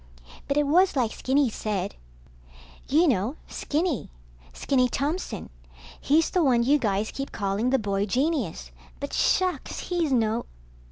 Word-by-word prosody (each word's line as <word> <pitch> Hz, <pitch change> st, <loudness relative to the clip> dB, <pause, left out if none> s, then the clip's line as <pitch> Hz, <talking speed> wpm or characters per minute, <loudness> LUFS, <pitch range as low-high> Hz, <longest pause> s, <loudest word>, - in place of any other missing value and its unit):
But 280 Hz, -, 0 dB
it 295 Hz, -, +3 dB
was 350 Hz, +5 st, +4 dB
like 240 Hz, -5 st, +1 dB
Skinny 265 Hz, -1 st, +1 dB
said... 200 Hz, -3 st, -3 dB, 0.9 s
You 320 Hz, +5 st, +4 dB
know, 235 Hz, +1 st, +1 dB
Skinny. 310 Hz, -, -2 dB, 0.4 s
Skinny 255 Hz, -, +1 dB
Thompson. 280 Hz, -, -3 dB, 0.5 s
He's 315 Hz, +3 st, +2 dB
the 360 Hz, -, +2 dB
one 245 Hz, -4 st, +3 dB
you 285 Hz, +5 st, +3 dB
guys 210 Hz, -2 st, 0 dB
keep 275 Hz, 0 st, -5 dB
calling 205 Hz, +4 st, -1 dB
the 265 Hz, -, +3 dB
boy 200 Hz, -3 st, -1 dB
genius, 245 Hz, -, -1 dB, 0.3 s
but -, -, -5 dB
shucks, 370 Hz, -1 st, +1 dB
he's 345 Hz, -5 st, 0 dB
no 230 Hz, -2 st, +1 dB
260 Hz, 135 wpm, -26 LUFS, 215-300 Hz, 0.9 s, was